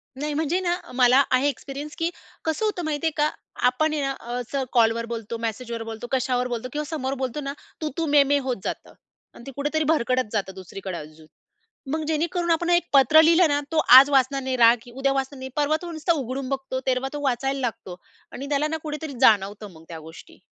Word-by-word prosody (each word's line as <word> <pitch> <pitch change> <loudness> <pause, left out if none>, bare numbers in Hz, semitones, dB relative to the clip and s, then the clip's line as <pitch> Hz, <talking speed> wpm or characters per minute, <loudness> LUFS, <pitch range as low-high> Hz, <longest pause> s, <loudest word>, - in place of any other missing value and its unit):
नाही 295 +3 -3
म्हणजे 320 +4 0
ना, 350 -2 0
अ, - - -14
मला 255 +2 +5
आहे 260 +3 +3
एक्सपिरियन्स, 280 +3 -7
की 330 0 0 0.4
कसं 320 +7 0
होतं 405 -5 -2
माहिती 310 +1 -1
आहे 320 - +1
का? 295 +1 +3 0.4
आपण 310 +5 +1
आहे 300 - -1
ना, 275 -1 -1 0.2
अस 245 +2 -5 0.2
कॉलवर 230 -1 +3
बोलतो, 230 -1 -5
मेसेजवर 230 +1 -4
बोलतो, 225 +1 -7
कशावर 250 -1 0
बोलतो 245 0 -4
किंवा 300 - -2
समोर 270 -5 -2
बोलतो 260 +4 -3
ना. 275 0 -4 0.3
तू-तू, 310 +2 -2
मे-मे 285 0 +5
होत 250 - -1
जातं. - - -5 0.4
आणि 235 - -14
ते - - -6
कुठेतरी 295 +2 -1
भरकडत 255 -4 0
जातं 195 -3 -2
दुसरीकडे 190 0 -7
अजून. 155 0 -12 0.6
मग 315 +1 -1
जेणेकरून 340 +2 0
आपण 340 +1 +1
एक 350 0 +3
पत्र 275 +3 +7
लिहिलं 335 +2 +5
ना, 285 - +2
तो 325 - -1 0.2
आज 275 +2 +8
वाचणार 275 0 +2
नाही, 260 -1 -1
राग 235 0 +4
उद्या 270 +1 +1
वाचणार 270 0 -3
नाही, 260 0 -6
परवा 295 +1 +2
तो 345 - -6
नुसता 330 +2 0
उघडून 265 -2 -4
बघतो. 265 -1 -3
तेरवा 255 +1 +1
तो 295 - -4
वाचायला 270 +1 0
लागतो 225 -7 -4 0.4
आणि 275 - -7
त्याला 295 +1 +1
ना 320 - -2
कुठेतरी 300 -1 -5
जाणवतं 205 -3 +3
मग 160 - -15
त्या 165 -1 -7
गोष्टी. 160 +1 -14
270 Hz, 205 wpm, -24 LUFS, 240-305 Hz, 0.6 s, आज